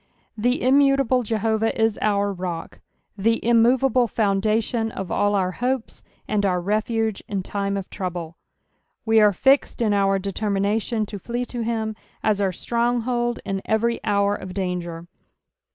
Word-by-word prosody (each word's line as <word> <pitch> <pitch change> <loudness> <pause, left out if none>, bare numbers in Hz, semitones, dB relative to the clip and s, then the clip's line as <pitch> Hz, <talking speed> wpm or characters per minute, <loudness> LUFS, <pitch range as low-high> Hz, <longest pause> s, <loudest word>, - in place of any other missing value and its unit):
The 245 +4 0
immutable 275 -1 +4
Jehovah 220 0 0
Is 225 -1 +2
our 205 -1 +1
roet, 175 -3 -5 0.4
the 225 +3 +1
immov 235 +2 +4
able 250 -2 +3
foundation 220 +2 0
of 190 -3 -6
all 205 0 +2
our 185 -2 +1
hopes 250 +3 -3 0.3
and' 210 -1 0
our 185 -2 +1
refuge 215 +2 -1
in 195 -3 -3
time 200 +1 -2
of 195 - -5
trouble: 175 -3 -5 0.7
we 225 0 +4
are 210 -1 +6
fixed 265 +8 +2
in 220 -3 +2
oar 195 -1 +2
determination 205 +3 -1
to 205 -1 -7
flee 240 +5 -3
to 240 -1 -5
him 220 -1 -2 0.3
as 210 -2 +2
our 195 -1 +1
stronghold 240 +3 -1
in 195 0 -2
every 230 +2 0
hour 200 -1 +2
of 185 -3 -7
danger. 175 -3 -3
215 Hz, 150 wpm, -23 LUFS, 195-235 Hz, 0.7 s, are